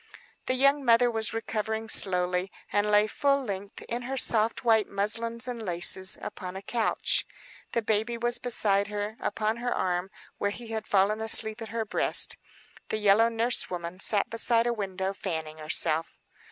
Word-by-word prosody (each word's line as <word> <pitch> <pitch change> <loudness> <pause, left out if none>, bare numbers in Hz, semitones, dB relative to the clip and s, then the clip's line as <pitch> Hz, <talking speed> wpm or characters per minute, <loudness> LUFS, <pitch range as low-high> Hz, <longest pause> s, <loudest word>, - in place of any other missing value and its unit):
The 255 - +1
young 275 +2 +3
mother 240 0 +4
was 220 -1 0
recovering 220 0 -4
slowly, 180 -2 +4 0.2
and 205 +1 +1
lay 210 0 +4
full 275 +5 0
length, 200 -3 -7
in 240 +1 -4
her 265 +2 -5
soft 225 -2 +2
white 220 -3 +3
muslins 230 +4 -1
and 240 -2 -5
laces, 185 +1 0
upon 185 -1 -7
a 190 - -8
couch. 230 0 0 0.5
The 235 - -1
baby 220 +2 -1
was 240 +1 +1
beside 205 -5 +3
her, 210 +1 -5
upon 215 +1 -2
her 245 +1 -3
arm, 180 -2 -2 0.3
where 200 - 0
he 230 +3 -9
had 220 -1 -5
fallen 205 +2 +1
asleep, 220 0 0
at 225 - -7
her 225 0 -3
breast. - - +3 0.5
The - - -1
yellow 210 +2 +4
nurse 230 +2 -1
woman 175 0 -6
sat 205 0 0
beside 230 0 +2
a 240 - 0
window 190 -3 -4
fanning 160 -5 -6
herself. 155 +1 +3
215 Hz, 165 wpm, -27 LUFS, 195-230 Hz, 0.5 s, mother